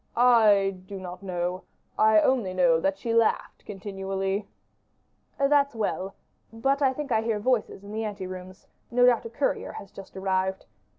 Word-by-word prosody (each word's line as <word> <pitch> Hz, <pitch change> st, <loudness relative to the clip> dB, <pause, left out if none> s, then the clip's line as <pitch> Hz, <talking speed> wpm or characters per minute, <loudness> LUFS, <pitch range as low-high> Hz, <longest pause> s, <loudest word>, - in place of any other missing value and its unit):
"I 210 Hz, -6 st, +4 dB
do 195 Hz, 0 st, -7 dB
not 180 Hz, 0 st, -8 dB
know; 180 Hz, -1 st, -3 dB, 0.3 s
I 215 Hz, 0 st, +5 dB
only 220 Hz, -8 st, +1 dB
know 170 Hz, -3 st, +4 dB
that 195 Hz, +3 st, 0 dB
she 230 Hz, +3 st, -3 dB
laughed 230 Hz, -1 st, +1 dB
continually." 195 Hz, 0 st, -3 dB, 0.9 s
"That's 280 Hz, -1 st, +3 dB
well; 195 Hz, -3 st, -2 dB, 0.4 s
but 270 Hz, +5 st, 0 dB
I 270 Hz, -2 st, +4 dB
think 280 Hz, 0 st, -6 dB
I 220 Hz, -1 st, +3 dB
hear 225 Hz, -1 st, -1 dB
voices 220 Hz, -3 st, -1 dB
in 200 Hz, -, -10 dB
the 220 Hz, +1 st, -3 dB
ante 200 Hz, -3 st, -5 dB
rooms 185 Hz, 0 st, -9 dB, 0.2 s
no 245 Hz, 0 st, +4 dB
doubt 245 Hz, -2 st, +3 dB
a -, -, -5 dB
courier 270 Hz, +4 st, -2 dB
has 195 Hz, -, -9 dB
just 195 Hz, 0 st, -12 dB
arrived. 190 Hz, 0 st, -1 dB
205 Hz, 165 wpm, -26 LUFS, 190-230 Hz, 0.9 s, I